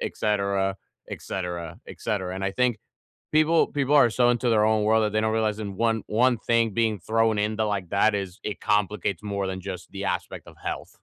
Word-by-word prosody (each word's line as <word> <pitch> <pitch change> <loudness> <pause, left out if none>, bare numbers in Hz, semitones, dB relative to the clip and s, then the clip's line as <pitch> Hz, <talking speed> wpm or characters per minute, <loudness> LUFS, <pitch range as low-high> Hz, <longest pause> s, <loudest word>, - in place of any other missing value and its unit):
etcetera, 100 -2 0 0.3
etcetera, 85 -1 -5
etcetera, 95 -3 -3
and 95 +1 -4
I 100 - -1
think 125 -2 +1 0.5
people 155 +2 +4
people 145 0 0
are 130 -5 +6
so 120 +2 +3
into 120 0 +1
their 105 -2 +4
own 110 -1 +2
world 110 +1 +3
that 105 0 -1
they 110 - +2
don't 110 0 +1
realize 110 -1 0
in 100 -2 -5
one 115 -2 +1
one 120 +2 +3
thing 115 -1 +2
being 110 -4 +1
thrown 110 +3 +1
into 110 +1 0
like 100 -4 -2
that 105 +2 +3
is 95 -2 -5
it 105 - -4
complicates 105 -2 0
more 100 -2 -2
than 95 0 -4
just 90 -2 -7
the 100 0 -5
aspect - - -4
of - - -13
health. - - -4
105 Hz, 200 wpm, -25 LUFS, 100-115 Hz, 0.5 s, are